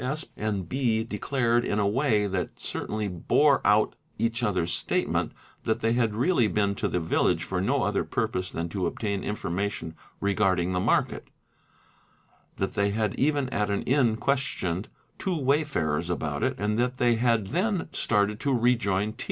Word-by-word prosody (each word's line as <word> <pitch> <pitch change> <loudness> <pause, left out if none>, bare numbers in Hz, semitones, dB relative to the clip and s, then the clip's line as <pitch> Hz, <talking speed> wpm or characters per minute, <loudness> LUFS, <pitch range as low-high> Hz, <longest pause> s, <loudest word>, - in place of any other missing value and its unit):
Sp. 135 +5 -4
and 100 -4 -2
B. 120 -3 +1
declared, 120 +2 0
in 105 - -1
a 100 -1 +2
way 110 -2 +2
that 95 -2 -3
certainly 110 -1 -3
bore 135 - +3
out: 105 +1 +4
_ - - -26 0.2
each 115 +1 0
other's 90 -7 0
statement, - - 0 0.3
that 110 +1 -1
they 115 +1 +2
had 115 -3 +1
really 125 0 +3
been 100 0 +1
to - - -2
the 90 - -1
village 80 -1 +1
for - - -2
no - - +1
other - - +1
7 - - -3
purpose 90 0 -1
than 85 +1 -3
to 90 -1 -1
obtain 100 +1 -3
information 95 -4 -3 0.3
regarding 95 -3 +1
the 90 - +1
market; - - 0 1.3
that 95 - -2
they 100 0 +1
had 105 0 0
even 145 -1 +1
at 105 -4 -1
an 100 - -1
inn 125 -4 +3
questioned 110 - -1 0.3
two 185 -3 -1
wayfarers 135 - 0
about 75 -4 -2
it - - +1
and 105 +3 0
that 125 +1 0
they 120 -2 +3
had 115 -3 +2
then 185 +3 0
started 105 -1 +1
to 140 - 0
rejoin 110 -4 +1
T. 115 - -24
110 Hz, 175 wpm, -27 LUFS, 95-125 Hz, 1.3 s, out